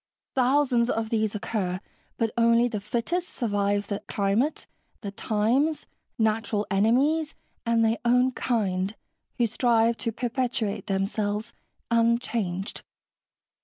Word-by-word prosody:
Thousands 255 -2 +3
of 225 -2 -1
these 220 -2 0
occur, 190 -4 -2 0.4
but 225 -2 0
only 235 +1 +4
the 220 -4 -3
fittest 245 - -2
survive 205 -3 0
the 200 0 -3
climate, 205 +9 0 0.4
the 200 -3 -5
times, 230 +10 +1 0.3
natural 220 -1 +1
enemies, 270 +10 +2 0.3
and 230 -1 +3
their 225 +1 +1
own 250 +2 +4
kind, 200 -6 -1 0.4
who 240 - +3
strive 230 0 +2
to 230 - -2
perpetuate 235 -3 -2
themselves 205 +2 -1 0.4
unchanged." 230 -5 0
225 Hz, 110 wpm, -26 LUFS, 205-245 Hz, 0.4 s, only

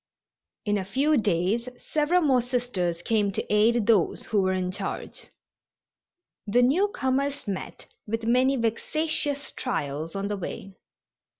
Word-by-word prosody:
In 205 -1 +1
a - - -2
few 280 +10 +2
days 210 +2 +1
several 310 +4 +1
more 265 -4 +4
Sisters 230 -9 -2
came 210 -2 +1
to - - -2
aid 220 +1 +4
those 210 -5 +2
who 210 -2 +1
were 190 0 +1
in 185 -1 -1
charge. 185 - -5 1.2
The 240 +4 +4
newcomers 280 - +1
met 195 -2 -5 0.2
with 225 +1 -2
many 255 +3 +3
vexatious 285 +5 -1
trials 155 - -3
on 195 0 -2
the 205 0 -2
way. 195 +1 -6
230 Hz, 130 wpm, -26 LUFS, 195-265 Hz, 1.2 s, more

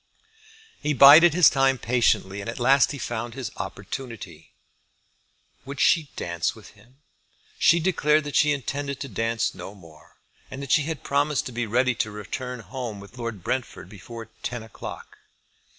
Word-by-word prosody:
He 150 -1 0
bided 150 +5 +9
his 175 -4 +7
time 135 -1 +2
patiently, 115 -5 +1
and 100 - -6
at 115 - -6
last 135 +2 +4
he 145 - -6
found 120 -1 -5
his 130 -5 -5
opportunity. 100 - -8 1.1
"Would 140 +1 -8
she 155 -4 +3
dance 85 0 -2
with - - -14
him?" 130 +5 -23 0.6
She 170 - +5
declared 155 -3 +2
that 145 -1 -6
she 150 - +4
intended 140 0 -3
to 140 - -4
dance 115 0 -1
no 100 - -9
more, 80 -5 -18 0.3
and 130 - -8
that 140 - -5
she 150 -3 +4
had 160 -3 -5
promised 145 0 0
to - - -6
be 120 -1 -3
ready 125 +3 +2
to 115 -2 -2
return 120 +4 -6
home 115 0 -6
with 100 +5 -13
Lord 115 -6 -5
Brentford 125 -7 -4
before 115 +3 -10
ten 120 -2 -4
o'clock. 110 - -10
125 Hz, 165 wpm, -25 LUFS, 110-140 Hz, 1.1 s, bided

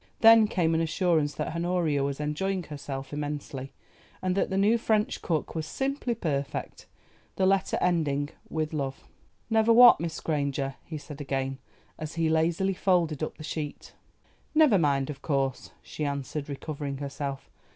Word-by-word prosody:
Then 225 -1 +8
came 170 -5 +1
an 160 - +2
assurance 160 -3 +1
that 165 - -3
Honoria 170 -4 +1
was 140 0 -2
enjoying 180 +6 -1
herself 140 -3 -6
immensely, 145 -2 -4 0.5
and 185 -1 0
that 195 - +1
the 190 - -1
new 215 +4 +4
French 215 -1 +1
cook 160 -4 -1
was 160 -2 -3
"simply 270 - -2
perfect;" 140 -9 -3 0.5
the 190 - +2
letter 195 0 +2
ending 145 -5 +1 0.2
"with 155 0 -2
love." 135 -3 -3 0.5
"Never 220 +1 +4
what, 240 +1 +9
Miss 165 0 -3
Granger?" 140 -3 -1
he 160 - -6
said 150 0 -9
again, 135 -1 -2 0.4
as 155 0 -6
he 165 -1 +1
lazily 165 +4 +2
folded 175 -6 +1
up 155 - -3
the - - -9
sheet. 150 -1 -5 0.6
"Never 300 -11 +6
mind, 140 -2 +1
of 140 - -10
course," 135 -3 -1
she 155 - -6
answered, 140 +1 -3
recovering 140 -1 -4
herself. 140 0 -5
155 Hz, 155 wpm, -28 LUFS, 140-185 Hz, 0.6 s, what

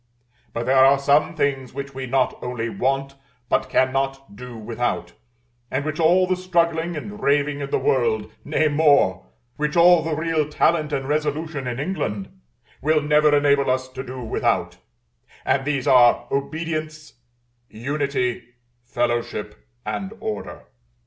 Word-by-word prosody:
But 115 - -4
there 130 0 +5
are 135 +1 +6
some 145 +3 +2
things 135 -4 -1
which 140 0 -6
we 130 0 -5
not 130 0 +1
only 120 -2 -3
want, 135 +5 -1 0.4
but - - +1
cannot 135 -2 0
do 125 +1 -9
without; 115 +2 -3 0.6
and 135 +2 -2
which 155 +1 -3
all 175 +3 +4
the 185 0 0
struggling 170 -2 0
and 205 +7 -7
raving 145 -1 +1
in 140 -1 -4
the - - +1
world, 110 -4 0
nay 155 +1 +1
more, 145 - +3 0.3
which 150 +2 -1
all 175 0 +7
the 160 0 -2
real 155 -1 0
talent 155 0 +1
and 135 -2 -2
resolution 150 -1 -2
in 120 0 -3
England, 140 - -3 0.5
will 155 +1 +2
never 150 0 +4
enable 140 -1 +3
us 130 0 0
to 130 0 -7
do 130 -1 -7
without: 110 - -1 0.7
and 135 0 +1
these 140 -3 -1
are 120 -2 +5
Obedience, 155 +2 -4 0.6
Unity, 135 +1 -2 0.4
Fellowship, 120 0 -2 0.3
and 195 +2 -4
Order. 220 0 -5
140 Hz, 140 wpm, -22 LUFS, 130-155 Hz, 0.7 s, all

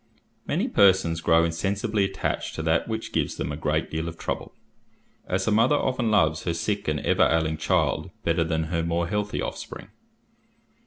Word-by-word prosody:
Many - - 0
persons 95 -4 +3
grow 80 0 +4
insensibly 100 +5 0
attached - - -3
to 80 - -4
that 80 0 +1
which 110 0 -4
gives - - -1
them - - -3
a - - -3
great 80 +1 -1
deal 80 +1 -2
of 85 0 -6
trouble, - - -4 0.8
as 95 +1 0
a 110 - +1
mother 115 +7 +4
often 130 -5 0
loves 80 -6 +3
her 85 -2 0
sick 100 +4 -2
and 75 -1 0
ever - - +3
ailing 80 -1 +1
child 75 - 0
better 85 0 +2
than 80 -1 -1
her 85 - +1
more 85 0 -1
healthy 105 +2 -2
offspring. - - -7
85 Hz, 175 wpm, -25 LUFS, 80-100 Hz, 0.8 s, grow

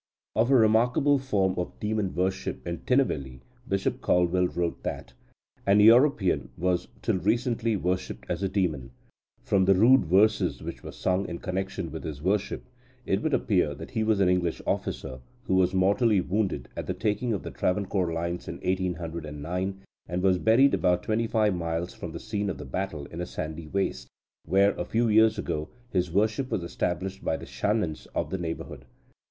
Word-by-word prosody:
Of 115 +4 +3
a 135 - +5
remarkable 120 +5 +4
form 100 -8 +1
of 90 - -5
demon 105 -2 -1
worship 95 +2 -2
in 85 0 -3
Tinnevelly, 70 - 0 0.3
Bishop 95 0 -1
Caldwell 90 +1 +2
wrote 85 +1 -2
that - - -5 0.5
"an 100 +1 +5
European 115 -2 +5
was 90 0 0 0.2
till 95 - +1
recently 115 +3 +1
worshipped 90 0 -2
as 85 +1 -2
a 95 - 0
demon. 80 -10 -1 0.5
From 95 -2 +2
the 95 0 +5
rude 120 +4 +6
verses 100 +6 +3
which - - -6
were - - -8
sung 95 +1 -1
in 85 - -4
connection 95 -2 -4
with 80 - -6
his 75 -3 -5
worship, 100 +5 -1 0.4
it 95 +2 0
would 155 - +1
appear 90 -9 +1
that - - -9
he 110 -3 0
was 110 -2 +2
an 95 - +4
English 90 -2 +1
officer, 65 -1 -3 0.2
who 95 - -1
was 95 -1 +4
mortally 100 +3 +3
wounded 95 - -1
at - - -5
the - - -2
taking 110 +3 -1
of 100 - -2
the - - -6
Travancore 95 -2 0
lines 85 +1 -3
in - - -5
1809, 90 0 -3 0.3
and 90 +2 -2
was 95 -2 +3
buried 125 +7 +5
about 90 0 +2
twenty 115 +1 0
five 110 -3 +2
miles 85 0 -3
from - - -7
the - - -6
scene 105 -2 -3
of 90 - -3
the 75 - -8
battle 75 +1 -4
in 85 +4 -7
a 90 - -4
sandy 80 -1 -5
waste, 95 +4 -2 0.4
where, 100 +3 +4
a - - 0
few 115 +1 +1
years 110 0 +5
ago, 75 -6 -3 0.2
his 90 -2 0
worship 110 +7 +1
was 90 - -1
established 90 +2 -3
by 80 - 0
the - - -9
Shanans 105 -7 -1
of 75 - -1
the 95 - -2
neighbourhood. 80 -2 -5
95 Hz, 180 wpm, -27 LUFS, 85-105 Hz, 0.5 s, rude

